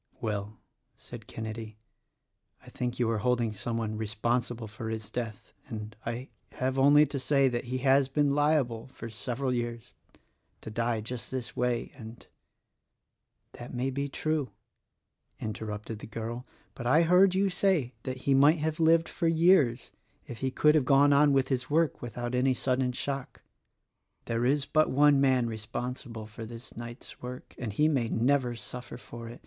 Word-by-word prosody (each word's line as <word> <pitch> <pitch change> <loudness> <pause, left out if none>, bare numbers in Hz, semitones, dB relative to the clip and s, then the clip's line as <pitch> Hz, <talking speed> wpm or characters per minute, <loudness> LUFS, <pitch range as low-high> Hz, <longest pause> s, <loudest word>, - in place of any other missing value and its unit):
"Well," 105 -1 -3 0.4
said - - -11
Kenedy, 110 -1 -6 0.9
"I - - -11
think 125 -1 -3
you 120 - +1
are 110 - 0
holding 120 -2 +1
some 115 +3 -3
one 110 -1 -2
responsible 115 +2 -1
for 110 +1 -6
his 110 -2 -5
death; 110 -4 -5
and 110 -3 -6
I 120 +3 -4 0.2
have 130 +1 -1
only 145 +2 +7
to 140 - -4
say 135 +1 +3
that 120 0 -3
he 125 +2 -2
has 135 0 +4
been 145 0 +2
liable 140 -6 +1
— - - -25
for 115 0 -7
several 125 +5 -2
years 120 -2 -4 0.3
— - - -44
to 110 - -7
die 115 0 0
just 120 +2 -6
this 130 -2 -5
way, 125 -1 -1
and 115 -3 -11 0.4
— - - -54
" - - -51
"That 120 +1 -8
may 130 +2 -1
be 140 +2 -2
true," 155 -2 -1 0.9
interrupted 110 0 -5
the - - -9
girl, 115 +2 -5 0.3
"but 120 - -5
I 155 +7 +5
heard 180 +3 +5
you 195 0 +2
say 180 -9 +1
that 130 +1 -5
he 140 - +4
might 145 +5 +6
have 155 +1 -2
lived 165 0 +4
for 170 - -1
years 165 -7 +4 0.3
if 120 - -8
he 130 - 0
could 150 +3 +4
have 155 -3 +4
gone 140 +1 +5
on 145 +1 +5
with 135 -1 +2
his 125 -3 -1
work 160 0 +1
without 120 +1 -4
any 130 +1 +2
sudden 130 0 0
shock. 135 +1 -5 0.8
There 115 +1 0
is 140 +1 +2
but 155 +2 +3
one 145 0 +5
man 130 -3 +3
responsible 115 +1 -5
for 110 +1 -9
this 115 +2 -9
night's 120 +1 -9
work 125 +1 -8
— - - -36
and 115 -3 -3
he 150 +10 +3
may 130 -7 +1
never 125 +1 +2
suffer 125 +1 -7
for 115 -1 -9
it. 120 - -10
125 Hz, 180 wpm, -29 LUFS, 115-140 Hz, 0.9 s, only